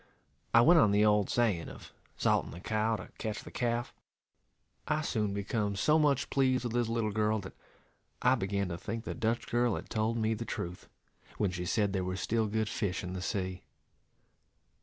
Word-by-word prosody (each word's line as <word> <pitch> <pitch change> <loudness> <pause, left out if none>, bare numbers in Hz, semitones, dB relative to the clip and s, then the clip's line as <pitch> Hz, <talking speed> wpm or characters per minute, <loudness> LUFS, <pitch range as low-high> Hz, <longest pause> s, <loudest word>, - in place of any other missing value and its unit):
I 115 - +7
went 165 +7 +7
on 110 - +5
the 105 +1 +4
old 105 -2 +3
saying, 105 -9 +1
of - - -12 0.2
salting - - +2
the 85 - -9
cow 110 +3 0
to 95 - -8
catch 110 -2 -3
the - - -10
calf. 120 -1 -1 0.9
I 150 +1 +1
soon 105 -8 -1
become 100 +1 -1
so 150 +10 +3
much 145 -3 +2
pleased 130 -2 +2
with 120 -2 -3
this 120 -1 +1
little 115 -2 0
girl, 110 +1 +1
that 95 - -9 0.7
I 125 - +4
began 100 -4 -1
to 85 0 -4
think 110 +4 -4
the - - -4
Dutch 115 -1 -1
girl 120 0 +2
had - - -7
told 110 +1 0
me 110 0 +1
the 110 +1 -4
truth, 90 -5 -6 0.5
when 100 -3 +1
she 90 -1 -4
said 105 -2 +1
there 95 -2 0
was 95 +1 -3
still 110 +4 0
good 110 +1 0
fish 100 -4 -2
in 90 0 -5
the 95 - -4
sea. 95 -2 -3
110 Hz, 195 wpm, -31 LUFS, 100-120 Hz, 0.9 s, I